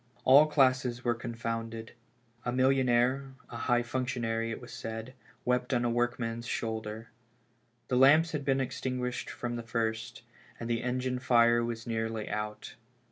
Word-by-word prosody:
All 140 +4 +7
classes 130 -4 +2
were 120 - +2
confounded. 115 -1 -5 0.5
A 125 - -1
millionaire, 130 +1 +2 0.2
a - - -7
high 120 0 +2
functionary, 120 -2 -2
it 115 - -4
was 120 -1 -11
said, 115 0 -6 0.3
wept 125 +1 +1
on 120 0 +1
a 120 - +1
workman's 115 -1 -1
shoulder. 110 -1 -4 0.8
The 125 - +1
lamps 155 +5 +6
had 150 -2 -3
been 135 -1 +2
extinguished 125 -1 -3
from 120 -1 -4
the - - -4
first, 115 -1 -3 0.4
and 115 - -5
the 120 0 0
engine 125 0 -1
fire 120 -2 +4
was 115 -1 -4
nearly 110 -2 -2
out. 105 0 -4
120 Hz, 145 wpm, -30 LUFS, 115-130 Hz, 0.8 s, All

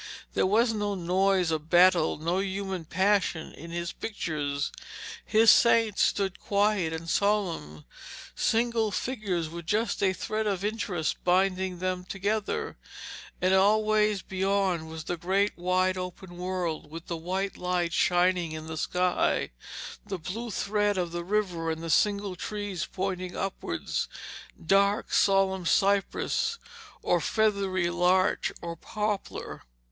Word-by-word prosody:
There - - +2
was 225 +4 +3
no 205 -1 -1
noise 185 0 +2
of 155 0 -3
battle, 175 -2 +5
no 170 +4 -1
human 190 -2 -3
passion 185 -1 +1
in 165 +3 -10
his 170 0 -3
pictures. 150 -9 -3 0.5
His 220 0 +6
saints 225 -3 +4
stood 195 -2 +1
quiet 200 -4 +1
and 160 +1 -5
solemn, 170 - 0 0.5
single 230 -1 +1
figures 200 -5 -2
with 170 +1 -8
just 215 +5 0
a 195 -2 +4
thread 215 +3 -2
of 195 -1 -1
interest 200 -7 -2
binding 185 0 +1
them 185 0 -2
together, 200 +3 -2 0.6
and 185 +1 +2
always 210 +1 +3
beyond 190 -3 0
was 160 0 -7
the 175 +2 -3
great 195 +4 +1
wide 185 +1 +1
open 180 0 -7
world, 180 -4 -3
with 165 +2 -8
the 170 - -4
white 185 +4 -3
light 180 -1 -1
shining 175 -2 +2
in 155 0 -6
the 160 0 -6
sky, 180 +3 +1 0.5
the 195 -2 -4
blue 215 +8 -5
thread 205 0 0
of 175 -2 -1
the 175 0 -4
river, 180 -4 -1
and 160 0 -3
the 165 - -2
single 200 +2 +2
trees 205 -1 -4
pointing 185 -1 -3
upwards 190 - -3 0.6
dark, 200 +3 +2
solemn 190 -2 +3
cypress, 200 - +1 0.5
or - - +2
feathery 195 -5 +1
larch 180 +2 +2
or 170 0 -4
poplar. 210 +2 -4
185 Hz, 130 wpm, -28 LUFS, 175-205 Hz, 0.6 s, His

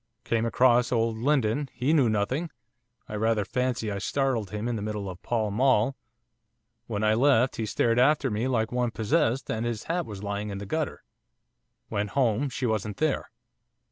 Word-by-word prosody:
Came 115 0 0
across 120 0 +3
old 115 -2 +1
Lindon, 135 0 +1
he 125 +6 +1
knew 135 -7 +4
nothing; 120 +11 -1 0.6
I - - -8
rather 110 -1 +1
fancy 125 -2 -1
I 100 - -3
startled 125 -3 0
him 105 +2 -4
in 120 - -1
the 110 - -3
middle 105 -1 -3
of 90 -1 -8
Pall 110 -3 -1
Mall, 130 +2 +3 0.9
when 105 - -2
I 110 0 +4
left 130 +1 +3
he 110 - -2
stared 115 +3 +1
after 135 0 +3
me 110 +4 -1
like 115 -2 0
one 125 -1 0
possessed, 115 +3 0
and 110 +1 -2
his 120 -2 -3
hat 170 0 -2
was 105 -2 -8
lying 100 +1 -3
in 100 - -4
the 100 - -6
gutter. 155 +8 -3 0.9
Went 105 0 -1
home, 130 +1 +2
she 125 +1 -3
wasn't 110 -3 -1
there. 155 -3 0
115 Hz, 180 wpm, -27 LUFS, 105-130 Hz, 0.9 s, knew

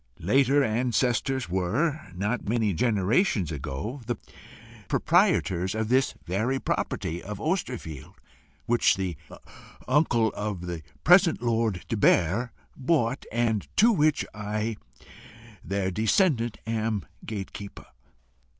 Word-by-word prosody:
Later 135 - +3
ancestors 125 +2 0
were, 115 - -1
not 105 +4 -2
many 110 -3 +1
generations 105 - +1
ago, 75 - -5
the 120 - 0 0.7
proprietors 110 - +2
of 110 0 -2
this 130 +1 +2
very 110 +9 0
property 85 -8 -2
of 105 -1 -7
Osterfield, 125 - -3 0.5
which 120 0 +3
the 95 -3 -2 0.7
uncle 130 -5 +3
of 105 -4 -4
the 85 -2 -5 0.2
present 175 -5 +5
Lord 115 -5 0
de 115 - -2
Barre 100 +5 +3 0.3
bought, 135 -3 0
and 115 -2 0
to 230 +3 +6
which 155 -7 +2
I, 105 +2 -3 0.9
their 95 -1 -1
descendant, 115 - +2
am 110 -3 -1 0.2
gate 100 -3 -6
keeper. 100 -1 -9
115 Hz, 110 wpm, -27 LUFS, 100-130 Hz, 0.9 s, to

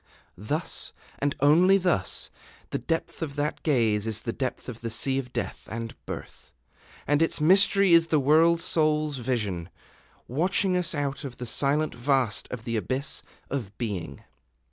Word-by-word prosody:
Thus, 150 - -3 0.3
and 140 0 0
only 175 +7 +6
thus, 180 - 0 0.4
the - - -1
depth 165 +1 -3
of 145 -4 -4
that 145 +1 -2
gaze 115 -8 +1
is 110 -1 -2
the 115 - -3
depth 130 -2 -4
of 120 -3 -7
the 115 - -3
Sea 130 +4 +1
of 125 -2 -7
Death - - -4
and 115 0 -4
Birth, - - -8 0.5
and 145 +1 +2
its 165 - +2
mystery 195 +3 +5
is 165 0 +6
the 155 -2 +3
World 160 +4 +4
Soul's 155 -3 +1
vision, 105 -9 -2 0.6
watching 180 +7 +1
us 175 -2 0
out 145 0 -2
of 135 -3 -7
the 125 - -5
silent 145 +5 +1
vast 125 -2 0
of 125 -3 -6
the 115 -2 -1
Abyss 130 +6 -2 0.3
of 110 -7 -4
Being. 95 - -4
140 Hz, 160 wpm, -27 LUFS, 115-160 Hz, 0.6 s, only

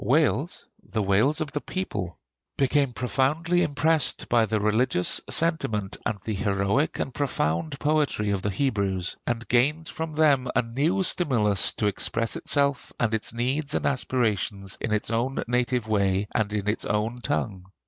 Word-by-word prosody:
Wales 135 - +1 0.2
the 110 -2 -2
Wales 110 - +2
of 150 -2 -3
the 145 - -3
people 95 - -4 0.4
became 140 0 +2
profoundly 140 +8 +1
impressed 155 -3 +1
by 115 -2 +3
the 110 +1 0
religious 105 -2 +2
sentiment 110 - +1
and 110 -3 -2
the 110 - -3
heroic 100 +7 0
and 135 - -3
profound 140 - -1
poetry 145 -9 +1
of 100 -2 -1
the 105 - -1
Hebrews, 100 -6 -1
and 115 -1 -2
gained 150 +7 +2
from 160 -1 -5
them 145 -4 +3
a - - +3
new 145 +12 0
stimulus 120 - +2
to 105 - -2
express 115 +2 0
itself 140 -2 0
and 115 -2 +1
its 110 - -1
needs 135 +6 -1
and - - -1
aspirations 105 -7 0
in 115 - -2
its 105 +1 0
own 120 +4 -1
native 125 -1 0
way 100 -2 +1
and 105 -2 0
in 105 -1 -2
its 105 - 0
own 110 +3 -1
tongue. 100 -9 -2
120 Hz, 160 wpm, -26 LUFS, 105-145 Hz, 0.4 s, by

